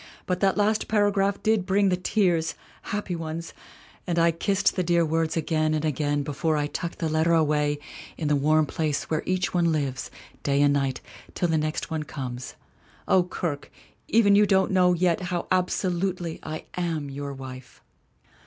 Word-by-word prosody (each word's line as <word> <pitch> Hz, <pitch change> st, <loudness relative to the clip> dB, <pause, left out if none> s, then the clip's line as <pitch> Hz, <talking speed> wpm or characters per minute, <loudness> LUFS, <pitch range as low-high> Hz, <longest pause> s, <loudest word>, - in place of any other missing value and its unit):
But 180 Hz, -1 st, -1 dB
that 195 Hz, +1 st, +2 dB
last 210 Hz, +1 st, +1 dB
paragraph 205 Hz, -2 st, +1 dB
did 215 Hz, -3 st, +2 dB
bring 200 Hz, 0 st, +3 dB
the 180 Hz, -, +2 dB
tears 180 Hz, -3 st, +1 dB, 0.3 s
happy 205 Hz, -3 st, -3 dB
ones 165 Hz, 0 st, -5 dB, 0.5 s
and 170 Hz, -1 st, -1 dB
I 170 Hz, 0 st, +4 dB
kissed 195 Hz, +4 st, +1 dB
the 185 Hz, -, +1 dB
dear 170 Hz, -1 st, +2 dB
words 160 Hz, +1 st, 0 dB
again 155 Hz, -1 st, +1 dB
and 155 Hz, 0 st, -1 dB
again 145 Hz, -1 st, 0 dB
before 150 Hz, +2 st, -1 dB
I 145 Hz, -, 0 dB
tucked 170 Hz, +3 st, -4 dB
the 165 Hz, -, -1 dB
letter 160 Hz, +2 st, +2 dB
away 150 Hz, -2 st, +2 dB, 0.4 s
in 155 Hz, -, -2 dB
the 150 Hz, -, +3 dB
warm 155 Hz, +2 st, +3 dB
place 150 Hz, 0 st, -2 dB
where 155 Hz, -, +1 dB
each 185 Hz, 0 st, 0 dB
one 170 Hz, -2 st, +2 dB
lives, 140 Hz, -4 st, -2 dB, 0.3 s
day 140 Hz, 0 st, +1 dB
and 145 Hz, 0 st, +4 dB
night, 135 Hz, -2 st, -1 dB, 0.3 s
till 175 Hz, -, 0 dB
the 160 Hz, -, +2 dB
next 155 Hz, +2 st, -3 dB
one 160 Hz, -1 st, -1 dB
comes. 130 Hz, -4 st, -6 dB, 0.5 s
O 185 Hz, -, +5 dB
Kirke! 170 Hz, -5 st, -4 dB, 0.4 s
Even 215 Hz, -3 st, +4 dB
you 205 Hz, +1 st, +5 dB
don't 190 Hz, -1 st, +3 dB
know 180 Hz, -1 st, +4 dB
yet 175 Hz, -1 st, +2 dB
how 175 Hz, -2 st, -2 dB
'absolutely' 180 Hz, -1 st, 0 dB
I 155 Hz, 0 st, -6 dB
am 160 Hz, -5 st, -2 dB
your 140 Hz, +1 st, -5 dB
wife!" 130 Hz, -1 st, -10 dB
165 Hz, 175 wpm, -26 LUFS, 150-185 Hz, 0.5 s, O